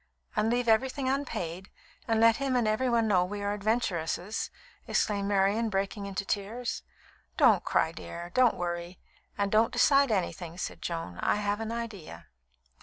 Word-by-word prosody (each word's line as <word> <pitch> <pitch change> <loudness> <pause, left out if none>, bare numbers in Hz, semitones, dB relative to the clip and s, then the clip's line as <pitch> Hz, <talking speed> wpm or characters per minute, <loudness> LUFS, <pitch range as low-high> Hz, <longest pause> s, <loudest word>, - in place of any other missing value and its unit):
"And 220 - +2
leave 245 +1 0
everything 260 +4 +2
unpaid, 190 - -3 0.4
and 225 -1 +2
let 230 0 +6
him 275 -2 -1
and 240 -3 +2
everybody 230 +1 +2
know 190 -4 +3
we 205 +3 -5
are 200 0 0
adventuresses!" 205 -3 -1 0.4
exclaimed 200 -2 0
Marian, 205 +3 +2
breaking 200 0 -2
into 200 0 -4
tears. 220 +5 -3 0.6
"Don't - - +5
cry, 160 - +1
dear; 170 +1 -8
don't 255 -2 +4
worry; 175 0 -4 0.4
and 200 -1 0
don't 220 +1 +4
decide 275 +2 +4
anything," 175 -3 -2
said - - -5
Joan. 165 - -4
"I - - +2
have 205 0 -1
an 225 0 -3
idea." 215 - -7
205 Hz, 155 wpm, -29 LUFS, 185-230 Hz, 0.6 s, let